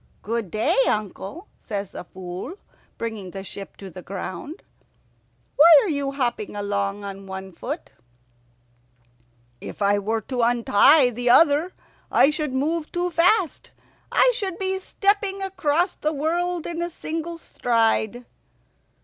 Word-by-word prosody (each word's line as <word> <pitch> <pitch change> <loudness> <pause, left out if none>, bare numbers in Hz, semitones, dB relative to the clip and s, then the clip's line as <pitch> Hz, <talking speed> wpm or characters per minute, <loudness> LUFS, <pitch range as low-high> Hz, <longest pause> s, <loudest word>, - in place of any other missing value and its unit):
"Good 225 -2 -2
day, 215 +5 +1
uncle," 215 - -3
says 200 -3 -5
the - - -7
Fool, 185 - -7 0.4
bringing 220 -5 -5
the 190 +2 -7
ship 195 0 -8
to 195 -2 -9
the 185 - -9
ground. 195 - -7 0.9
"Why 305 - +8 0.2
are 405 - -2
you 280 -3 -1
hopping 240 -6 -2
along 200 0 -2
on 195 -1 -7
one 190 0 -7
foot?" 260 - -6 1.7
"If - - -9
I 205 0 +3
were 220 +2 -1
to 250 +3 -3
untie 245 +3 +5
the 245 +1 -1
other 310 +6 +5 0.4
I 275 - +5
should 300 -2 -2
move 305 +4 -1
too 355 0 -1
fast. 350 +1 +2 0.4
I - - +5
should 390 -6 -3
be 380 -1 -1
stepping 395 0 0
across 355 -2 0
the 305 +1 -2
world 340 +3 -1
in 340 0 -3
a 345 - -1
single 330 0 -5
stride." 230 -4 0
260 Hz, 135 wpm, -23 LUFS, 205-335 Hz, 1.7 s, Why